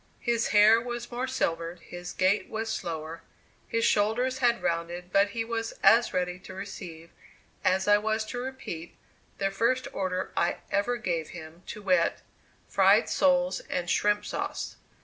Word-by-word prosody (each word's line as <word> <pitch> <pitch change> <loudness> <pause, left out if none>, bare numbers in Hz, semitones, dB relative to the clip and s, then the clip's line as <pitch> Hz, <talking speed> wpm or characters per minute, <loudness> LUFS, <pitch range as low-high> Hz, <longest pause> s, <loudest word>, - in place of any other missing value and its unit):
His 235 -2 +1
hair 215 +2 +6
was 240 0 -5
more 245 +2 -2
silvered, 170 -9 -2
his 175 0 -8
gait 190 +2 +1
was 225 0 -3
slower, 165 -2 -5 0.5
his 230 0 0
shoulders 245 +5 +2
had 240 -2 +2
rounded, 170 +2 -2
but 200 +1 +4
he 225 +2 -3
was 225 -1 -3
as 235 +1 +6
ready 180 0 -1
to 190 0 -11
receive, 170 -4 -8 0.5
as 190 +1 +2
I 205 0 +6
was 220 +1 -1
to 245 +3 -5
repeat, 245 -10 -6 0.4
the 195 -1 0
first 235 +6 +1
order 185 -1 -2
I 170 - +1
ever 240 +5 +1
gave 170 -7 -2
him, 160 +1 -11
to 210 - -7
wit: 180 -3 +2 0.4
"Fried - - +4
soles 270 -1 +2
and 175 -1 -2
shrimp 210 +4 +2
sauce." - - -4
205 Hz, 155 wpm, -28 LUFS, 175-235 Hz, 0.5 s, hair